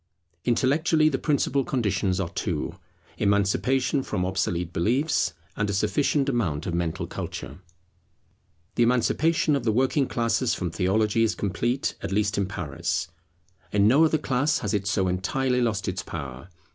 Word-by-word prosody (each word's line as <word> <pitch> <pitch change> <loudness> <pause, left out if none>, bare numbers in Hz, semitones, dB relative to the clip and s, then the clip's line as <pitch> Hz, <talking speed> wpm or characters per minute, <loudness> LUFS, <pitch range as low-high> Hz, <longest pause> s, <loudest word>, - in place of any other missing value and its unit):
Intellectually 155 +6 +3
the 135 - -2
principal 140 -2 +1
conditions 100 -7 0
are 90 -3 -1
two; - - -3 0.5
Emancipation 125 +7 +2
from 95 -8 -2
obsolete 90 -2 -1
beliefs, 125 - +1 0.2
and 105 -1 -1
a - - -1
sufficient 140 +7 +1
amount 95 - -1
of 90 - -3
mental 85 -2 -1
culture. 70 +5 -6 1.1
The - - 0
emancipation 145 +6 +2
of 140 - -2
the 115 - +2
working 130 +4 +2
classes 115 +1 0
from 90 -3 -3
theology 105 +5 +1
is 110 -1 +2
complete, 120 +6 -1
at - - -4
least 105 +1 +1
in 100 - 0
Paris. 80 -8 -3 0.6
In 100 0 +4
no 140 +8 +5
other 160 0 +3
class 145 0 +1
has 105 - -1
it 100 -1 -1
so 100 -2 +1
entirely 125 +8 0
lost 110 -5 0
its 90 -1 -2
power. 70 -1 -7
110 Hz, 150 wpm, -25 LUFS, 95-130 Hz, 1.1 s, no